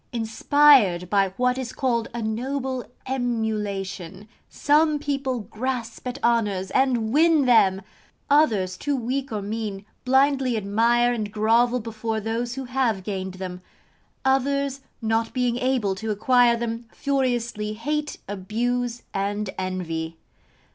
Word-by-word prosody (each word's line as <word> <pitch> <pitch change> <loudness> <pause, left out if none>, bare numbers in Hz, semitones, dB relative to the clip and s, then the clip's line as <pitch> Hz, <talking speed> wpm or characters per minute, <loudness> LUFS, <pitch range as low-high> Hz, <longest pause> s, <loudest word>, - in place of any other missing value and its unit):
Inspired 225 -5 +4
by 195 -2 +3
what 250 +1 +1
is 255 -2 -4
called 235 -4 0
a 235 -1 -4
noble 255 +3 -2 0.2
emulation, 210 -6 -3 0.2
some 300 +1 +3
people 275 -4 -2
grasp 230 +3 -4
at 250 +1 -4
honours 205 -5 +1
and 245 -4 +1
win 315 -1 +4
them; 195 -6 +4 0.4
others, 215 -11 +3
too 290 -1 -1
weak 260 +2 -2
or 210 -2 -3
mean, 205 -1 -4 0.2
blindly 265 -2 +3
admire 230 +4 +2
and 215 -3 -3
grovel 230 +4 +3
before 225 0 -3
those 230 +3 -3
who 270 - -4
have 245 -6 0
gained 190 -2 -4
them; 185 -1 -6 0.6
others, 275 +1 +1 0.2
not 225 +1 0
being 245 -2 0
able 250 -6 +1
to 220 +4 -5
acquire 240 +3 +4
them, 230 0 -4
furiously 240 -6 -1
hate, 295 +7 -3
abuse, 235 +5 -2
and 200 0 -2
envy. 165 -3 -3
235 Hz, 125 wpm, -24 LUFS, 210-260 Hz, 0.6 s, Inspired